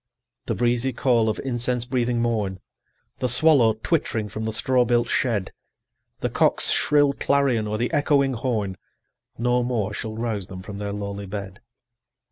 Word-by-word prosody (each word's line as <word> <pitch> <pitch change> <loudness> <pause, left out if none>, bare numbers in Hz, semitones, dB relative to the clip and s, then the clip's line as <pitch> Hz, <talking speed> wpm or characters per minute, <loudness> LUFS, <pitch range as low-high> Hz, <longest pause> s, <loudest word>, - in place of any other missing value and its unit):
The - - -1
breezy 120 +2 +1
call 115 -3 +2
of 110 - -2
incense 125 -2 -1
breathing 125 -2 0
morn, 105 -5 -1 0.6
The 125 - 0
swallow 125 -3 +5
twittering 115 -10 0
from 110 +3 -5
the 110 - -1
straw 125 +3 +2
built 120 0 +1
shed, 110 -7 -1 0.7
The - - 0
cock's - - +3
shrill 145 -1 +3
clarion, 135 -7 +1
or 105 0 -2
the 120 +7 -2
echoing 145 -2 +2
horn, 110 -6 -2 0.6
No 125 +1 +1
more 115 -4 -1
shall 110 0 -5
rouse 110 -5 -3
them 95 -1 -9
from 100 +1 -8
their 100 0 -3
lowly 100 -1 -5
bed. 100 -1 -7
120 Hz, 155 wpm, -24 LUFS, 105-125 Hz, 0.7 s, swallow